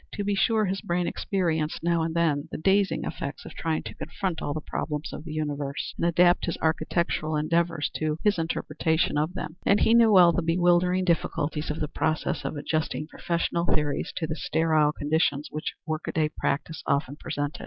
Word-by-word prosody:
To 205 - -3
be 205 0 0
sure 215 +2 +2
his 190 0 -2
brain 175 0 -1
experienced, 165 -7 -1
now 170 -1 +2
and 160 0 -2
then, 155 -4 +1
the - - -4
dazing 195 +4 +2
effects 140 - -5
of 165 - -9
trying 160 -1 -2
to - - -7
confront 185 -5 -4
all - - -2
the 155 - -2
problems 150 0 -4
of - - -7
the 160 - -6
universe 145 -2 -3
and 170 - 0
adapt 175 +1 +4
his 170 - -2
architectural 160 0 0
endeavors 165 +1 0
to 155 -1 -1
his 205 -4 +3
interpretation 160 -1 0
of 155 +5 0
them; 175 -3 -5
and 200 - +3
he 225 - +4
knew 230 -2 +6
well 180 -4 +8
the 170 - 0
bewildering 175 +2 +3
difficulties 155 -3 0
of 150 - -3
the 150 - -1
process 155 +1 -1
of - - -3
adjusting 155 +1 -2
professional 170 +1 -1
theories 150 -1 0
to 165 - -1
the 155 0 -3
sterile 160 -3 +2
conditions 150 -1 0
which 155 - -4
workaday 155 -1 -1
practice 155 +3 -2
often 140 0 0
presented. 145 -2 -4
160 Hz, 185 wpm, -26 LUFS, 150-175 Hz, -, well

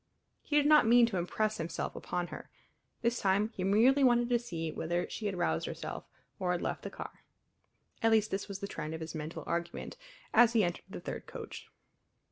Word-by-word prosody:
He 295 - -3
did 295 -1 +5
not 300 -6 +6
mean 240 +1 +7
to 225 -5 -2
impress 215 +5 0
himself 165 +1 -3
upon 175 -1 -3
her; - - -9 0.5
this 235 0 +1
time 200 +2 +2
he 195 -5 -5
merely 235 +9 +5
wanted 240 -1 +4
to 240 -1 +3
see 165 -9 -4
whether 175 +3 -2
she 215 - -4
had 195 -2 -3
roused 80 - 0
herself, - - -6 0.3
or 180 -1 +1
had 175 - -2
left - - -2
the - - -5
car. - - -9 0.8
At 225 - +4
least 215 -1 +3
this 195 +1 -2
was 200 -2 -6
the 200 - -3
trend 155 -5 -5
of 160 - -7
his 160 -1 -5
mental 155 0 -5
argument 170 - -3 0.4
as 240 -1 +6
he 225 -3 +4
entered 175 -1 -2
the - - -7
third - - -6
coach. - - -8
200 Hz, 205 wpm, -32 LUFS, 175-235 Hz, 0.8 s, mean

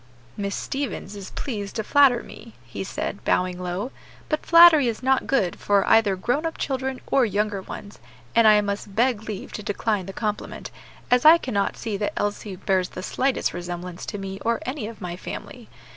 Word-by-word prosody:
"Miss 200 -1 -3
Stevens 255 -7 -4
is 195 -2 -8
pleased 205 -7 -5
to 220 - -1
flatter 265 -1 +4
me," 230 0 -12
he 110 -5 -6
said, - - -4
bowing 180 0 +1
low; 180 +7 -3 0.4
"but 305 - -1
flattery 335 -5 +8
is 230 +1 -3
not 265 0 +2
good 195 -10 +1
for 200 -1 +2
either 215 -3 +4
grown 245 - -1
up 325 0 -3
children 265 -1 -2
or 270 - +3
younger 210 -2 0
ones, 205 +2 -9 0.4
and 230 -1 +6
I 210 -1 +7
must 200 -1 -4
beg 235 -2 +1
leave 205 -3 -6
to - - -5
decline 205 -1 -1
the - - -5
compliment, 210 -1 -4 0.4
as 250 0 +4
I 320 +2 +9
cannot 205 -10 -1
see 215 -3 -3
that 205 0 -2
Elsie 205 -1 -2
bears 185 0 0
the 185 - -8
slightest 265 +5 0
resemblance 175 0 -6
to 205 - -4
me 195 0 -6
or 230 +2 0
any 255 -4 -3
of 225 -2 -10
my 175 -2 -4
family. 180 - -8
210 Hz, 190 wpm, -24 LUFS, 195-250 Hz, 0.4 s, I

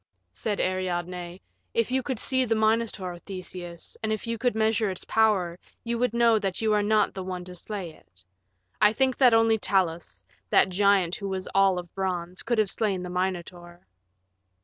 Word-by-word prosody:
Said 210 -2 -2
Ariadne, 180 -1 -2 0.4
"If 230 +1 +1
you 260 0 +2
could 260 -1 -3
see 260 +3 0
the 225 -2 +1
Minotaur, 215 -5 0
Theseus, 180 -2 -7
and 220 - -1
if 215 -2 -2
you 230 -1 -3
could 245 -1 +1
measure 220 -1 +2
its 185 - -6
power, 195 -6 +2 0.2
you 235 0 -2
would 250 -1 +2
know 235 -1 +4
that 195 -3 -2
you 220 -1 +2
are 210 - +3
not 215 +1 +2
the 190 - -5
one 180 -1 -5
to 180 - -9
slay 180 -1 -6
it. 90 - -21 0.6
I 210 - +6
think 260 +1 +2
that 250 -4 +6
only 225 -1 +4
Talos, 170 - -1 0.3
that - - +4
giant 190 -2 +2
who 200 -1 -5
was 190 -1 -4
all 195 -1 +4
of 175 -1 -7
bronze, 180 -1 -3
could 235 0 -1
have 210 -3 +2
slain 200 -5 -1
the 180 - -6
Minotaur." 175 -1 -4
195 Hz, 185 wpm, -26 LUFS, 180-220 Hz, 0.6 s, I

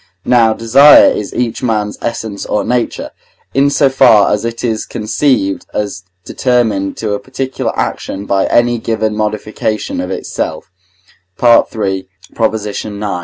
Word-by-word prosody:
Now 115 -3 +4
desire 135 +6 +6
is 105 - -4
each 120 -2 -2
man's 105 -4 -1
essence 110 -3 -4
or 105 - 0
nature, 125 +2 -2 0.4
in 140 +1 +3
so 140 0 +3
far 125 -7 +4
as 105 - -1
it 115 0 -4
is 110 -3 -1
conceived 110 -2 -1
as 100 -2 -3 0.2
determined 115 -6 0
to 110 -2 -2
a 100 - -2
particular 130 +4 -4
action 100 +1 -3
by 95 -1 +1
any 120 0 +2
given 110 -1 -2
modification 110 0 -3
of 90 - -5
itself 95 - -4 0.7
(III. 105 -5 +2 0.4
ix. 105 -2 -5
110 Hz, 130 wpm, -14 LUFS, 105-120 Hz, 0.7 s, desire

